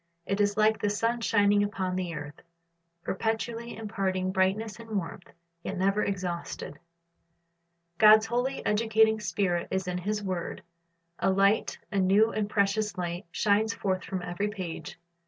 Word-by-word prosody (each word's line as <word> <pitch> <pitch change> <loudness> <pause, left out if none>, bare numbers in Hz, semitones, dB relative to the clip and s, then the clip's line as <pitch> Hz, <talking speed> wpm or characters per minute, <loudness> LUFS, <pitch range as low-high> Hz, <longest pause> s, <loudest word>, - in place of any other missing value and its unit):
It 200 +1 0
is 205 0 +1
like 215 0 +3
the 205 - +1
sun 230 +3 0
shining 205 -2 +3
upon 190 -3 -1
the 180 -2 -3
earth, 145 0 -8 0.6
perpetually 230 +3 -3
imparting 195 -4 -2
brightness 200 +4 0
and 225 -2 -4
warmth, 175 -1 -6 0.3
yet 195 - -5
never 195 +3 +2
exhausted. 175 -6 -4 1.2
God's 215 0 +8
holy, 245 +4 -2
educating 220 0 +3
Spirit 180 -5 -1
is 190 -1 -2
in 180 0 -2
His 210 +3 -2
word. 185 -3 -4 0.6
A - - +2
light, 195 +3 +2
a 200 - +1
new 200 +4 +4
and 210 -1 -2
precious 205 0 +1
light, 175 +1 -4
shines 215 +4 +1
forth 185 -2 -1
from 185 -2 -4
every 180 +4 -2
page. 185 -6 -6
200 Hz, 145 wpm, -28 LUFS, 185-215 Hz, 1.2 s, God's